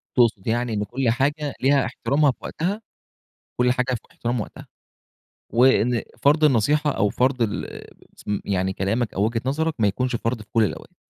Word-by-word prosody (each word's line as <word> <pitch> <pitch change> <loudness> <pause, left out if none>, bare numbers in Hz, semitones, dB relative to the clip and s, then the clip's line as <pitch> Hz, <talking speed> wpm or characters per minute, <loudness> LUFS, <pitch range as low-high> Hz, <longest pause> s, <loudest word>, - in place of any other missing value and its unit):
تقصد 115 -6 +2
يعني 120 0 0
إن 105 0 -1
كل 120 +3 -1
حاجة 145 +4 0
ليها 135 0 +3
احترامها 140 +4 +1
في - - -15
وقتها؟ 195 +7 -3 0.8
كل 125 0 +4
حاجة 125 0 0
في 115 - -4
احترام 120 0 -2
وقتها، - - -8 0.8
وإن 120 -1 +3 0.2
فرض 150 +2 +4
النصيحة 150 +3 +3
أو 105 -4 +1
فرض 125 +2 +1
ال 110 -3 -2 0.6
يعني 95 -1 0
كلامك 105 +5 -1
أو 100 - +1
وجهة 115 +1 -1
نظرك 160 +4 0
ما 105 - +4
يكونش 125 +5 -1
فرض 115 0 -2
في 105 - -14
كل 115 - +4
الأوقات. 105 - -4
125 Hz, 170 wpm, -23 LUFS, 110-140 Hz, 0.8 s, كل